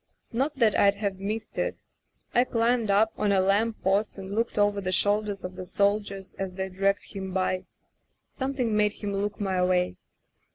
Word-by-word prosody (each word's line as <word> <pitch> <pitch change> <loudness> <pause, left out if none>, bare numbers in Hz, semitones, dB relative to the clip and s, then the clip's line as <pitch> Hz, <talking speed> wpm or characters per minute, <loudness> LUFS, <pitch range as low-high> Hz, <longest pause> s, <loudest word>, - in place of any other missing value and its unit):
Not 275 +6 0
that 230 -6 +3
I'd 200 0 +5
have 200 -2 -3
missed 215 +3 -4
it. - - -1 0.6
I 245 - +5
climbed 235 -2 +1
up 215 +3 +4
on 210 -1 +2
a 195 - +4
lamp 205 +4 +1
post 200 +3 +1
and 195 0 -6
looked 230 +1 -1
over 205 -1 +3
the 185 -1 -2
shoulders 205 +2 +1
of 185 0 -6
the 185 - -6
soldiers 200 -1 0
as 190 -1 -3
they 190 +1 -3
dragged 195 +2 0
him 190 -2 -5
by. 185 0 0 0.6
Something 260 -5 -2
made 210 -1 +3
him 205 -1 -4
look 200 +1 -2
my 190 -3 +1
way. 180 - +1
200 Hz, 180 wpm, -27 LUFS, 190-215 Hz, 0.6 s, I'd